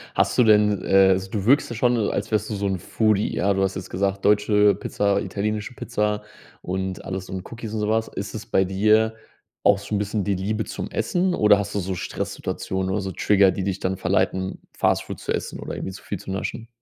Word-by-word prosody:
Hast - - +2
du 125 - +6
denn, 105 -2 +4
äh 95 0 +5
also 95 0 +1
du 100 -3 -2
wirkst 135 +1 +4
da - - -4
schon 120 +2 +2
so, 110 -3 +1
als 100 +2 -3
wärst 105 0 0
du 105 - -2
so 100 0 -1
'n 95 -2 -1
Foodie, 110 +3 +1
ja? 100 +2 +2
Du 95 - 0
hast 95 0 -1
jetzt 95 - -6
gesagt, 95 +1 -1
deutsche 105 -1 +4
Pizza, 100 +1 0
italienische 105 +3 -3
Pizza 105 -3 -1 0.4
und 95 0 -3
alles 95 -1 -5
und 95 -1 -6
Cookies 115 -2 -7
und 110 - -2
so 105 0 -1
was. 110 +1 +1
Ist 100 -1 -6
es 110 -1 -6
bei 95 -4 +2
dir 110 +4 +3 0.5
auch 100 - +5
so 100 +1 -4
'n 100 - +1
bisschen 105 0 -1
die 100 +1 0
Liebe 105 +3 -2
zum - - -5
Essen 180 +1 0
oder 105 -1 +5
hast 100 0 -4
du - - +1
so 95 0 -3
Stresssituationen 95 +1 -3
oder 100 +1 0
so 95 -1 -4
Trigger, 100 0 +4
die 95 - -3
dich 95 0 -2
dann 95 +1 -1
verleiten, 95 +1 0 0.2
Fast - - +2
Food - - -7
zu - - -2
essen - - -4
oder - - -6
irgendwie - - -4
so 95 - -11
viel 100 - -5
zu 95 - -7
naschen? 115 +4 -4
100 Hz, 235 wpm, -23 LUFS, 95-105 Hz, 0.5 s, du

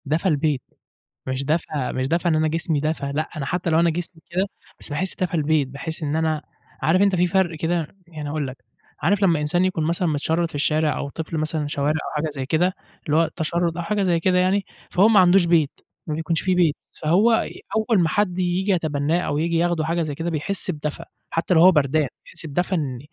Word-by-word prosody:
دفا 160 +6 +1
البيت، 150 -3 +1 0.7
مش 130 +1 -2
دفا 150 -3 -1
مش 130 0 -1
دفا 170 +3 +1
إن 160 - +2
أنا 155 0 +2
جسمي 160 -1 -1
دفا 155 -1 -1
لأ 155 +1 -1
أنا 140 - -3
حتى 175 +4 -1
لو 160 0 +3
أنا 170 0 +4
جسمي 165 0 -5
كده 185 +3 0 0.3
بس - - -5
باحس 155 +6 -1
دفا 185 -2 -2
البيت 155 -3 +2
باحس 160 +5 -6
إن 150 0 -1
أنا 160 -1 0 0.4
عارف 175 +4 +3
أنت 200 -2 +4
في 180 0 +3
فرق 175 -2 +1
كده 165 0 -1
يعني 155 -3 -6
هاقول 150 -1 -2
لك 130 +1 -8 0.4
عارف 200 +5 +2
لمّا 170 -5 +4
إنسان 175 +5 +1
يكون 185 -4 0
مثلًا 170 +2 0
متشرد 160 +2 0
في - - -10
الشارع 155 +1 +1
أو 140 - -3
طفل 160 +2 -5
مثلًا 155 -1 -1
شوارع، 145 0 0
أو - - -6
حاجة 155 +1 -1
زي 135 -3 -5
كده 170 +6 +1 0.3
اللي 150 0 +1
هو 165 - +5
التشرد 165 +1 -1
أو 175 - -2
حاجة 210 +2 0
زي 175 -3 +2
كده 180 +2 +2
يعني، 190 +2 +2 0.3
فهو 195 +4 +5
ما 220 -3 +6
عندوش 180 0 +5
بيت 165 -4 +3 0.4
ما 155 - -2
بيكونش 160 +1 -1
في 185 -1 +1
بيت 170 -4 +3 0.3
فهو 180 +9 +4 0.4
أول 220 -1 +2
ما 165 - +2
حد 185 0 0
ييجي 185 +2 +1
يتبناه 155 -1 +1
أو 145 - -1
ييجي 165 +2 +1
ياخده 170 -2 +1
حاجة 170 +2 0
زي 150 -2 -4
كده 165 +3 -3
بيحس 180 +4 -2
بدفا 150 -2 -5 0.2
حتى 165 +2 0
لو 160 - +5
هو 185 +2 +9
بردان، 150 -2 +2 0.2
بيحس 170 - -7
بدفا 175 +5 -1
إن 135 -7 -2
165 Hz, 220 wpm, -23 LUFS, 150-175 Hz, 0.7 s, هو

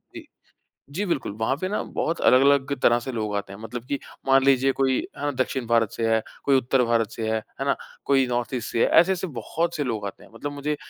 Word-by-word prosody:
जी, - - -8 0.7
जी 180 +9 -2
बिल्कुल। 140 - -2
वहाँ 120 +5 +1
पे 185 +6 -3
ना 210 - -1
बहुत 165 +1 -2
अलग-अलग 140 +1 +4
तरह 120 - +5
से 130 +2 -6
लोग 110 -3 -3
आते 100 -1 -4
हैं। 100 - -10
मतलब 115 +2 -7
कि 140 - -1 0.3
मान 135 0 +5
लीजिए 135 0 +4
कोई 130 -1 +1 0.2
अ, 145 0 -1
दक्षिण 130 -1 -1
भारत 115 -2 +2
से 115 - -2
है, 110 0 +2 0.2
कोई 140 -1 +4
उत्तर 130 0 +2
भारत 115 -2 +1
से 110 -1 -4
है, 110 - +1 0.2
है - - 0
ना? 140 - +2 0.3
कोई 135 -2 +3
नॉर्थ 120 +1 -2
ईस्ट 120 -2 -4
से 115 - 0
है, - - +5
ऐसे-ऐसे 185 +1 +4
बहुत 165 +5 -3
से 145 - -1
लोग 110 -5 -3
आते 100 - -8
हैं। - - -18
मतलब 145 +5 -5
मुझे 145 +1 -2
130 Hz, 235 wpm, -24 LUFS, 115-140 Hz, 0.7 s, तरह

